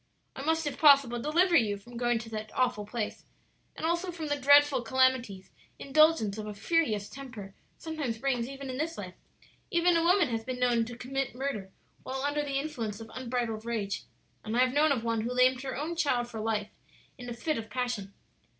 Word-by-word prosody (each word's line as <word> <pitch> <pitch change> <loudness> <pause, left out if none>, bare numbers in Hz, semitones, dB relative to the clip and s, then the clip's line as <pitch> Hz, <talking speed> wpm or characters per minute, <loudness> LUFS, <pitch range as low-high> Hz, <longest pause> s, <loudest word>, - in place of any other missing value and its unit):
"I - - -6
must 320 +2 0
if 290 - -4
possible 275 -5 +6
deliver 340 +6 +3
you 210 -7 +3
from 240 +5 -14
going 240 0 +1
to 225 0 -7
that 215 -1 -6
awful 245 -5 0
place, 225 -1 -4 0.5
and - - -4
also 345 +2 0
from 325 -3 -5
the 290 - +2
dreadful 285 -1 +5
calamities 245 -5 +1 0.3
indulgence 280 -8 +3
of 215 - -5
a 210 - -6
furious 215 -5 +1
temper 245 -8 -9 0.2
sometimes 300 -8 -4
brings 245 -1 -1
even 275 -1 -6
in 255 - -5
this 325 +2 -2
life; - - -6 0.6
even 345 0 +3
a 335 - +3
woman 350 -3 +4
has 225 -1 -2
been 255 +1 -5
known 240 -2 +2
to 240 +1 -8
commit 270 0 -3
murder 250 -8 -4 0.3
while 265 +1 -4
under 290 +1 0
the 280 -2 -2
influence 235 -8 -3
of 225 0 -10
unbridled 240 -3 -3
rage; 215 -4 -3 0.4
and 220 +2 -2
I - - +5
have 255 0 +3
known 300 +1 +4
of 250 -5 0
one 230 -1 0
who 235 +3 -3
lamed 255 0 +4
her 265 -2 -4
own 315 +4 -3
child 255 -7 +1
for 230 -2 -7
life 215 -1 -1 0.5
in 245 -1 -7
a - - -4
fit 300 +3 -1
of 220 0 -8
passion. 245 -6 -3
255 Hz, 205 wpm, -29 LUFS, 225-290 Hz, 0.6 s, possible